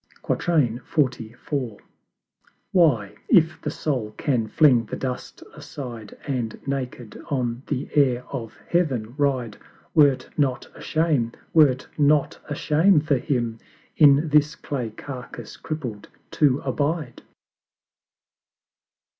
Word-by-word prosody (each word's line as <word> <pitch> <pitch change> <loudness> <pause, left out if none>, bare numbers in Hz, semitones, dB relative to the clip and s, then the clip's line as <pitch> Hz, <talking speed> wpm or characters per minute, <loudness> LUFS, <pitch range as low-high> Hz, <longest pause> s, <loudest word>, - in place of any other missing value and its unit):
XLIV. 125 -4 -1 0.9
Why, 140 - +3 0.2
if 165 -6 +4
the 150 - -2
Soul 125 -8 -3
can 120 -6 0
fling 125 -1 +4
the - - -5
Dust 130 -2 -5
aside, 120 -6 -8
And 125 -5 -3
naked 130 -4 -4
on 125 -3 -1
the 135 -2 -2
Air 130 -4 +3
of 115 -5 -6
Heaven 130 -10 0
ride, 130 -7 0 0.4
Were't 145 -4 +4
not 135 -4 0
a - - -13
Shame 155 -8 +1 0.2
were't 140 -5 +4
not 145 0 +3
a 145 - -2
Shame 160 +4 +4
for 145 -2 +1
him 120 -4 -2 0.4
In 150 +1 +5
this 150 +1 +3
clay 125 -5 -4
carcass 125 -1 -9
crippled 125 -10 -6 0.2
to 145 -2 +3
abide? 145 0 -2
135 Hz, 110 wpm, -24 LUFS, 120-150 Hz, 0.9 s, In